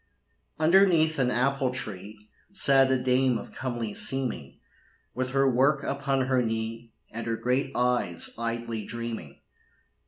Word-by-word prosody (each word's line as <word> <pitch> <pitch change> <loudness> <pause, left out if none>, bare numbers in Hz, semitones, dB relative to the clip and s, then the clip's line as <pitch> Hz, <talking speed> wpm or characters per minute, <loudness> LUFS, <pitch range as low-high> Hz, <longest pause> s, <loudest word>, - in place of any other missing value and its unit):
Underneath 160 -2 +4
an 125 -2 +2
apple 135 +2 +1
tree 105 -3 -7 0.2
Sat 135 -8 +4
a 130 - +3
dame 125 0 +2
of - - -10
comely 120 -4 -4
seeming, 130 - 0 0.5
With 130 +1 -2
her 135 +1 +2
work 135 +3 +2
upon 140 -1 -1
her 130 -1 +2
knee, 115 0 -4 0.2
And 115 +1 -6
her 115 -1 -1
great 125 +4 0
eyes 125 -9 0
idly 115 -1 -4
dreaming. 115 -11 -7
125 Hz, 130 wpm, -27 LUFS, 115-135 Hz, 0.5 s, Underneath